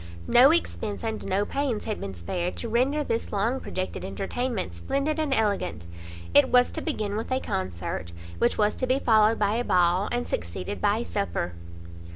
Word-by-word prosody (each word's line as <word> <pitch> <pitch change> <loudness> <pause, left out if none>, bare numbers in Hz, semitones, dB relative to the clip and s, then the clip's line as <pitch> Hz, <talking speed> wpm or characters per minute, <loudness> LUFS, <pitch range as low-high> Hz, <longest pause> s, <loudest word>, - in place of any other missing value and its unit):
No 255 +3 +7
expence 235 -11 -1
and 220 -1 -3
no 200 +2 +1
pains 270 -3 -1
had 215 -2 -4
been 95 -1 -5
spared 175 - -3
to 235 - -4
render 260 +6 +1
this 230 -4 -2
long 225 +6 0
projected 185 -6 -4
entertainment 200 - -3
splendid 275 - -1
and 305 -3 0
elegant; 200 - 0 0.5
it - - +6
was 250 0 +4
to - - -4
begin 215 -11 -2
with 225 +4 -4
a 260 - +2
concert, 85 - -4 0.3
which 120 - +2
was 210 -1 +2
to 255 - -1
be 255 +1 +3
followed 220 -3 +4
by 210 +1 +1
a 240 - 0
ball, 180 -1 +2
and 245 0 -1
succeeded 90 +3 -4
by - - +3
a - - -3
supper. 85 +1 -2
215 Hz, 185 wpm, -26 LUFS, -, 0.5 s, No